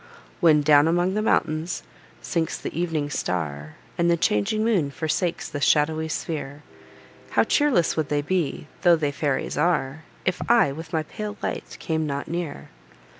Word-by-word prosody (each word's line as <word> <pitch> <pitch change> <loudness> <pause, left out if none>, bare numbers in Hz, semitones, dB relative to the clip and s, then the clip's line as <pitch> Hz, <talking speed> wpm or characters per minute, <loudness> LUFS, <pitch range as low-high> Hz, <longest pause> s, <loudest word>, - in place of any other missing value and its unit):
When, 155 -3 +5
down 145 0 +5
among 175 +3 +2
the 215 - 0
mountains, 160 -4 0 0.4
sinks 165 -2 -1
the - - -5
ev'ning 160 -4 -1
star, 75 - -3 0.2
And 170 0 +3
the 170 - +3
changing 160 - +1
moon 190 -11 +2
forsakes 165 +3 -2
this 145 -1 -4
shadowy 155 +1 +2
sphere, 150 -2 -4 0.7
How - - +3
cheerless 280 - +2
would 155 -2 -1
they 145 0 0
be, 170 -2 -1 0.2
tho' 175 -2 +6
they 150 -3 -1
fairies 140 0 -1
are, 150 -2 0 0.2
If 185 - 0
I, 230 -11 +5
with 160 +3 -8
my 160 -3 0
pale 210 +6 -6
light, - - -4
came 160 -2 -1
not 140 -1 -3
near! 165 - -5
160 Hz, 160 wpm, -24 LUFS, 145-175 Hz, 0.7 s, tho